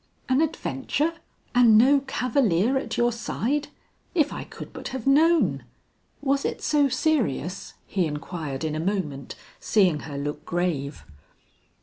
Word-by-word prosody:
"An 260 +3 +3
adventure! 310 0 -1 0.4
and 240 -3 +6
no 270 +5 +6
cavalier 250 -5 +1
at 265 - -2
your 240 0 +3
side! 240 +5 -2 0.5
If 305 -4 +2
I - - -6
could - - -10
but - - -6
have 260 -4 -5
known! 320 +5 +4 0.6
Was 275 0 +1
it - - -3
so 290 -2 +3
serious?" 245 - -1
he 185 -4 0
inquired 150 -1 -5
in 155 -1 -1
a 155 - -2
moment, 160 -7 -3 0.2
seeing 185 -8 +3
her 145 -2 -7
look 145 +1 -4
grave. 155 -5 -2
225 Hz, 135 wpm, -25 LUFS, -, 0.6 s, and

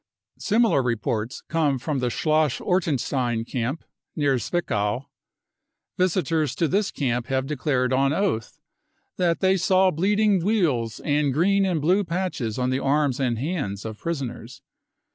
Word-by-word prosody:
Similar 220 - +3
reports 115 -1 -2
come 150 -4 +1
from 140 +2 -2
the 125 -1 0
Schloss 155 +3 +1
Ortenstein 130 -9 0
camp 125 +5 -3 0.3
near 140 -4 +1
Zwickau. 120 - -1 0.9
Visitors 165 -5 0
to 165 - +1
this 200 +5 +1
camp 125 -3 -2
have 130 0 0
declared 130 -3 0
bn 135 +1 +2
oath 185 - -1 0.6
that 170 -2 +1
they 190 0 +3
saw 185 +1 +3
bleeding 200 +3 +2
weals 155 - 0
and 145 -1 +2
green 195 +7 +2
and 175 -4 0
blue 180 +7 +2
patches 170 - -3
on 125 0 0
the 130 - 0
arms 140 -1 +1
and 125 -4 0
hands 125 - -3
of 110 -1 -6
prisoners. 140 -8 -5
145 Hz, 140 wpm, -24 LUFS, 125-180 Hz, 0.9 s, Similar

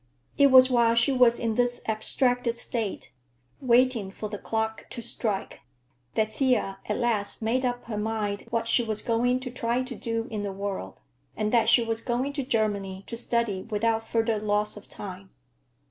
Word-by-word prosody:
It 280 - +6
was 260 -1 +8
while 235 -2 +3
she 235 +4 +5
was 250 -3 +4
in 230 -1 -1
this 245 +1 +1
abstracted 235 +2 0
state, 230 -4 -1 0.5
waiting 245 -4 +3
for 210 +2 -6
the 205 -1 -6
clock 220 0 -3
to - - -6
strike, 220 -3 -3 0.6
that 220 0 0
Thea 225 -7 0
at 210 - 0
last 225 -3 0
made 245 +4 0
up 245 -1 -2
her 215 -3 -4
mind 210 -2 -3
what 230 -1 -1
she 235 - +5
was 220 -2 -2
going 245 +2 +1
to 250 -1 -6
try 245 0 -1
to 255 0 -7
do 230 -2 -3
in 215 -2 -3
the 200 -1 -3
world, 195 - -5 0.4
and 215 - -1
that 230 -2 +4
she 235 0 +6
was 225 0 -1
going 255 +4 -2
to 280 -1 -2
Germany 205 -6 -1
to 230 - -6
study 230 -4 0
without 225 +2 0
further 225 -1 0
loss 210 0 -1
of 210 - -13
time. 190 -1 -8
230 Hz, 180 wpm, -26 LUFS, 210-245 Hz, 0.6 s, was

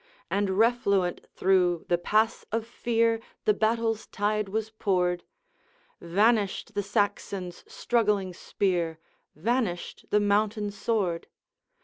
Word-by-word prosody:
And 195 -1 0
refluent 200 -6 +2
through 180 -3 +2
the 175 -1 +2
pass 215 +5 +1
of 225 0 -1
fear 230 -1 +1 0.3
The 210 - +5
battle's 225 +1 0
tide 210 -1 -1
was 220 +2 -2
poured; 180 -5 0 0.8
Vanished 205 +4 +1
the 205 - 0
Saxon's 200 -3 -2
struggling 210 -6 +1
spear, 175 -3 -1 0.4
Vanished 210 - -2
the 210 - +4
mountain 205 0 +1
sword. 200 -5 -1
205 Hz, 105 wpm, -27 LUFS, 185-225 Hz, 0.8 s, The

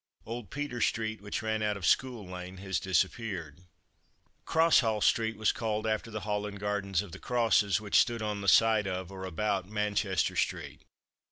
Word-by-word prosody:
Old 115 -3 -6
Peter 140 -2 -4
street 110 -1 0
which 100 +2 -4
ran 110 0 -1
out 105 -1 0
of 95 - -5
School 125 0 +1
lane 90 0 -7
has 95 -2 -2
disappeared. 95 -3 -1 0.9
Crosshall 145 -10 +4
street 115 -1 +2
was 110 0 +3
called 110 -2 -2
after 110 +1 -1
the 110 -1 -5
Hall 105 +1 -2
and 100 -1 -8
gardens 100 -2 -1
of 100 - -11
the - - -9
Crosses 115 -5 +2
which 105 -2 +3
stood 115 -2 +1
on 105 -1 -2
the 100 - -5
site 110 0 +5
of 95 0 -4
(or 95 -1 -7
about) 95 +1 -1
Manchester 105 -3 0
street. - - -2
105 Hz, 175 wpm, -30 LUFS, 95-110 Hz, 0.9 s, site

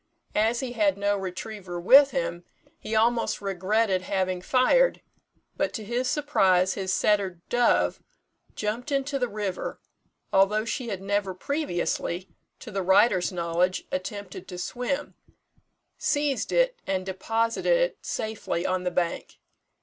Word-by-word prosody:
As 225 +4 +2
he 260 -2 -4
had 205 -5 +2
no 205 0 +1
retriever 190 -1 -5
with 270 +10 +7
him, 255 -11 -3 0.4
he 220 - -4
almost 230 +1 +2
regretted 195 +1 0
having 185 -1 -1
fired; 265 - +3 0.5
but, - - -1
to 220 - -5
his 245 +3 -1
surprise, 190 -12 +3
his 190 -1 -3
setter, 195 -3 +1
Dove, 245 0 +2 0.5
jumped 225 +6 -3
into 275 0 0
the 250 - +1
river, 205 -4 -4 0.5
although 205 +3 +3
she 240 +1 -3
had 195 -3 -4
never 200 -1 -1
previously 185 - -2 0.3
(to 225 - -9
the 195 -1 -2
writer's 190 0 +4
knowledge), 175 +1 0
attempted 185 0 -5
to 180 - -7
swim, 250 +9 -3 0.9
seized 290 -3 0
it, - - +2
and 190 -1 -1
deposited 225 - +1
it - - 0
safely 215 -5 -3
on 185 -1 0
the 180 - 0
bank. 175 -1 -2
205 Hz, 135 wpm, -26 LUFS, 185-245 Hz, 0.9 s, with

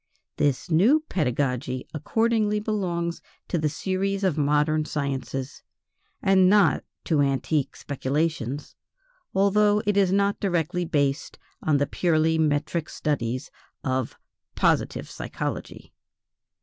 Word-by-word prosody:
This 145 +4 0
new 225 - +5
pedagogy 130 -4 -1
accordingly 215 +6 +1
belongs 180 -6 -2 0.3
to 175 - 0
the 155 -1 +1
series 190 +5 -2
of 185 -6 +2
modern 150 +1 +2
sciences, 135 -2 -4 0.6
and 190 -1 +5
not 205 0 +4 0.2
to 155 -4 +2
antique 140 +1 0
speculations, 145 -1 -2 0.6
although 205 +2 +3
it 205 0 +1
is 195 -2 +4
not 200 +1 +2
directly 175 -2 0
based 140 -3 -1 0.2
on 155 -2 +2
the 145 - +2
purely 160 0 +1
metric 155 +1 0
studies 130 -4 -2 0.3
of 130 -2 -2 0.4
"positive - - +1
psychology." - - -6
160 Hz, 110 wpm, -25 LUFS, 145-195 Hz, 0.6 s, new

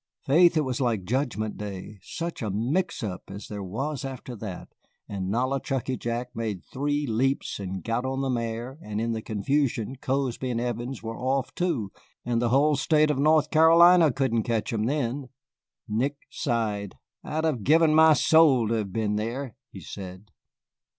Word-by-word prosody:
Faith, 165 +4 +5
it - - +4
was 130 -1 -2
like 115 -6 0
judgment 110 -1 -2
day, 100 0 -7
such 170 0 -5
a 110 - -2
mix 130 - -1
up 95 -4 -4
as 100 +2 -8
there 105 -1 -6
was 130 +9 -3
after 130 -2 -6
that, 100 -4 -7 0.4
and 95 -2 -4
Nollichucky 130 +3 -1
Jack 120 +1 -4
made 110 -5 -3
three 145 +2 -1
leaps 130 +2 0
and 95 -1 -5
got 115 +2 -1
on 135 +1 -2
the 135 - -1
mare, 120 +3 -3
and 105 0 -4
in 115 +1 -1
the 110 -1 -2
confusion 115 +3 -1
Cozby 130 -1 -2
and 120 -2 -1
Evans 120 +1 -4
were 115 0 -5
off 130 +1 -1
too, 150 - -1 0.3
and 120 -1 0
the 120 - +1
whole 145 +4 +4
State 150 +2 +3
of 140 - -2
North 155 +1 +3
Carolina 165 +1 +7
couldn't 120 -3 +1
catch 115 +2 -1
'em 110 -1 0
then." 135 0 -2 0.6
Nick 130 +7 -1
sighed. 105 -4 -2 0.3
"I'd 155 +1 -2
have 145 -9 0
given 160 +3 +5
my 160 0 +7
soul 145 -6 +5
to - - +1
have 105 -4 -2
been 105 0 -1
there," 115 +3 -4
he - - -10
said. 95 +1 -9
125 Hz, 170 wpm, -26 LUFS, 110-140 Hz, 0.6 s, Carolina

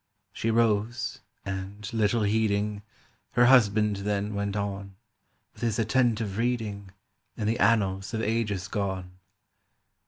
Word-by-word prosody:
She 115 - -2
rose, 115 +1 +1 0.3
and, 100 +1 -5
little 110 0 +2
heeding, 105 -1 +1 0.5
Her 120 +1 +5
husband 105 -5 +5
then 100 +1 -2
went 100 0 -2
on 100 -1 -4 0.6
With - - -16
his 115 -3 0
attentive 115 -3 +1
reading 110 -5 -2 0.5
In 105 - -2
the 115 +3 0
annals 100 -3 +2
of 110 - -1
ages 105 -4 -1
gone. 95 -3 -3
105 Hz, 120 wpm, -27 LUFS, 100-115 Hz, 0.6 s, Her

